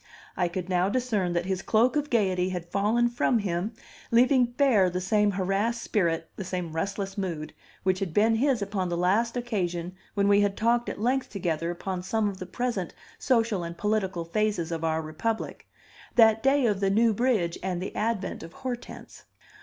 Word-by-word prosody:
I 180 - +1
could 175 +1 -4
now 185 0 +2
discern 210 -7 0
that 175 0 0
his 190 0 -2
cloak 235 +6 +2
of 295 0 0
gayety 190 -5 +1
had 175 -2 -5
fallen 220 +4 +2
from 240 0 +1
him, 200 +1 -2 0.3
leaving 250 +2 +5
bare 240 -6 +3
the 180 +1 -2
same 210 +3 +2
harassed 200 +5 0
spirit, 165 -6 0
the 195 - -4
same 180 -2 -4
restless 195 +3 -3
mood, 165 -5 -4 0.3
which 185 0 +1
had 195 -4 -2
been 220 +5 +3
his 255 -3 +2
upon 195 -2 -2
the 170 - -1
last 215 +7 +1
occasion 180 -7 -2 0.2
when 200 -1 +2
we 205 0 +5
had 200 -1 0
talked 235 +2 +2
at - - -6
length 255 +4 0
together 170 -4 -2
upon 180 +1 -4
some 210 +3 0
of 195 -2 -5
the 185 - -6
present 210 -4 -3 0.2
social 225 -7 +1
and 170 0 -6
political 190 -4 -1
phases 180 -2 -1
of 165 -1 -3
our 160 0 0
republic 160 +9 -3 0.5
that 220 -2 +6
day 270 +1 +3
of 205 -4 +1
the 195 -1 +2
New 225 +3 +3
Bridge 210 -7 +1
and 185 -2 -2
the 185 - -5
advent 215 -2 -2
of 165 +1 -10
Hortense. 245 -2 -7
200 Hz, 185 wpm, -27 LUFS, 180-230 Hz, 0.5 s, that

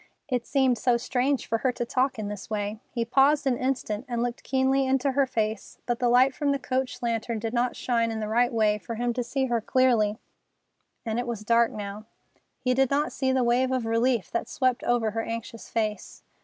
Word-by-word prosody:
It 250 -4 -2
seemed 265 -4 +2
so 245 -2 +3
strange 255 +3 0
for 225 - -1
her 255 +2 +1
to 240 - -3
talk 255 +2 0
in 215 -2 -4
this 205 0 -7
way. 210 0 -3
He 235 -2 -2
paused 280 +5 +3
an 260 -2 +2
instant, 255 -4 -2
and 240 -1 -1
looked 245 0 -3
keenly 265 0 +1
into 270 +1 +2
her 275 0 +2
face, 220 -3 -3
but 240 -1 -1
the 245 - +2
light 255 +2 +5
from 285 +1 0
the 280 - +1
coach 260 -1 -3
lantern 230 0 -1
did 225 +1 -4
not 245 0 0
shine 230 -2 0
in 225 -1 -3
the 215 - -3
right 240 +3 +2
way 215 -2 +2
for 230 - -6
him 240 +1 -1
to 245 +1 -2
see 265 +3 -1
her 240 -3 0
clearly, 225 -4 +2 0.9
and 225 +1 -1
it 245 - -3
was 230 -3 -4
dark 230 +1 +3
now. 205 +1 -6 0.5
He 255 -1 0
did 265 0 +2
not 290 +2 +1
see 265 -1 0
the 260 -1 +2
wave 250 +2 +2
of 255 -3 0
relief 230 -1 +1
that 235 - -2
swept 255 -3 0
over 235 -3 +1
her 225 +1 -2
anxious 230 0 -6
face. 215 -2 -3
240 Hz, 220 wpm, -26 LUFS, 225-260 Hz, 0.9 s, light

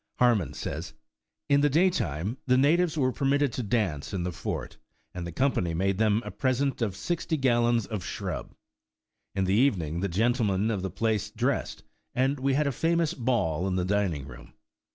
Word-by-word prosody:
Harmon 110 - +3
says: 65 - -5 0.5
In 140 0 +4
the 145 - +4
daytime 130 - +1
the 125 0 +4
natives 160 +4 +3
were 130 -3 +2
permitted 140 -1 +1
to - - -2
dance 100 - -1
in 90 - -2
the 90 - -2
fort, 85 - -5 0.4
and 90 -1 -5
the - - -5
Company 90 - 0
made 95 +3 0
them 110 +1 +2
a - - -5
present 135 0 0
of 105 -5 0
sixty 170 - -2
gallons 120 -4 +2
of 105 -5 -5
shrub. - - -5 0.8
In 95 - +1
the 95 +1 +1
evening 95 - +2
the 100 +2 -1
gentlemen 110 +1 +1
of 100 -4 -2
the 95 - -2
place 110 -2 -1
dressed, 125 +6 -2 0.3
and 135 +2 +1
we 135 0 +1
had 150 +2 +2
a 140 - +1
famous 165 +4 +1
ball 105 - 0
in 95 - -1
the 90 -1 0
dining 95 -8 0
room. 65 -1 -12
115 Hz, 180 wpm, -27 LUFS, 95-135 Hz, 0.8 s, In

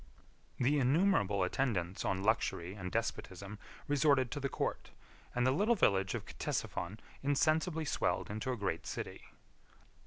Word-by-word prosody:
40 - - -1
The 145 +4 +4
innumerable 130 - +3
attendants 95 -4 0
on 95 0 0
luxury 95 -4 +1
and 90 -3 -6
despotism 105 -3 -3 0.3
resorted 140 -3 +3
to 145 - -3
the 140 0 -1
court, - - -2 0.5
and 125 0 +2
the 130 - +4
little 210 - +3
village 95 - +3
of - - -4
Ctesiphon 90 +5 -3 0.2
insensibly 155 +3 +2
swelled 135 - 0
into 110 +5 -2
a 125 - -2
great 95 -5 -2
city. - - -5
125 Hz, 145 wpm, -34 LUFS, 95-145 Hz, 0.5 s, The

